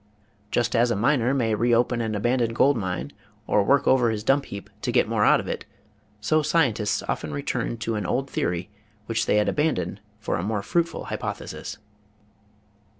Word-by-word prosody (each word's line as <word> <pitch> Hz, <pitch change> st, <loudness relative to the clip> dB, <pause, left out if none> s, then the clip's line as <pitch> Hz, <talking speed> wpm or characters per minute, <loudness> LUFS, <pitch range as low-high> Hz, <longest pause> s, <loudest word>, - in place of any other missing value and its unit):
Just 120 Hz, +1 st, 0 dB
as 120 Hz, +1 st, +4 dB
a 115 Hz, -, +1 dB
miner 120 Hz, +3 st, +2 dB
may 120 Hz, -5 st, +1 dB
reopen 120 Hz, +2 st, +2 dB
an 110 Hz, -1 st, -2 dB
aban 120 Hz, +5 st, +1 dB
doned 115 Hz, -1 st, 0 dB
gold 140 Hz, +4 st, +4 dB
mine 95 Hz, +4 st, -3 dB, 0.3 s
or 105 Hz, -, +3 dB
work 140 Hz, +8 st, +3 dB
over 125 Hz, -3 st, +4 dB
his 110 Hz, -1 st, -2 dB
dump 135 Hz, +3 st, +2 dB
heap 100 Hz, -2 st, -8 dB
to -, -, -1 dB
get -, -, +3 dB
more -, -, +1 dB
out -, -, +5 dB
of -, -, -6 dB
it, -, -, -3 dB, 0.6 s
so 155 Hz, +9 st, +2 dB
scientists 135 Hz, -9 st, +1 dB
often 75 Hz, -, -3 dB
return 75 Hz, +10 st, -2 dB
to 115 Hz, 0 st, -3 dB
an 105 Hz, -4 st, -2 dB
old 135 Hz, +2 st, 0 dB
theory 90 Hz, -5 st, -2 dB, 0.3 s
which 115 Hz, 0 st, -1 dB
they -, -, +3 dB
had 105 Hz, 0 st, +3 dB
abandoned 105 Hz, -, 0 dB, 0.2 s
for 105 Hz, -5 st, -2 dB
a 85 Hz, -, -3 dB
more 105 Hz, 0 st, -2 dB
fruitful 170 Hz, -, -1 dB
hypothesis. -, -, -5 dB
115 Hz, 185 wpm, -25 LUFS, 105-130 Hz, 0.6 s, out